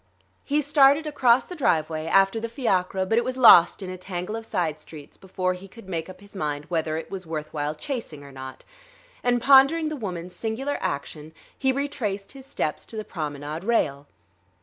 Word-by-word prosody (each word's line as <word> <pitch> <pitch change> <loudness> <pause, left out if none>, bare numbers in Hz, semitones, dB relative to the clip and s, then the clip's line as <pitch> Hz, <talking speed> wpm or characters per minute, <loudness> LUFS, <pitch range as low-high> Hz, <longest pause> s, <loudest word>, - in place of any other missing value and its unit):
He 295 +1 0
started 285 +1 +5
across 260 -4 +3
the - - -8
driveway, 160 - 0
after 195 +5 +3
the 230 +1 -4
fiacre, 190 -7 0
but 225 +5 +2
it - - -1
was 255 0 -3
lost 195 -6 +7
in 185 - -6
a 185 - -8
tangle 185 +2 -5
of 225 0 -7
side 160 -4 -1
streets 150 -1 -12
before 185 -1 -2
he 185 +2 -10
could 215 0 -15
make 170 -2 -4
up 185 - -12
his 200 0 -15
mind 150 -4 -3
whether 160 -2 -1
it 165 - -7
was 190 -3 -6
worth 155 -1 -5
while 150 0 -2
chasing 165 - -6
or 140 - -12
not; 130 0 -9 0.6
and, 245 0 +2
pondering 275 +5 +5
the 310 - -4
woman's 180 - -6
singular 235 +8 -3
action, 150 +2 -4 0.2
he 265 -1 +1
retraced 255 -8 -3
his 270 -1 -12
steps 155 - -3
to 225 - -8
the 215 - -4
promenade 150 -1 -5
rail. 145 -11 0
190 Hz, 195 wpm, -25 LUFS, 160-245 Hz, 0.6 s, lost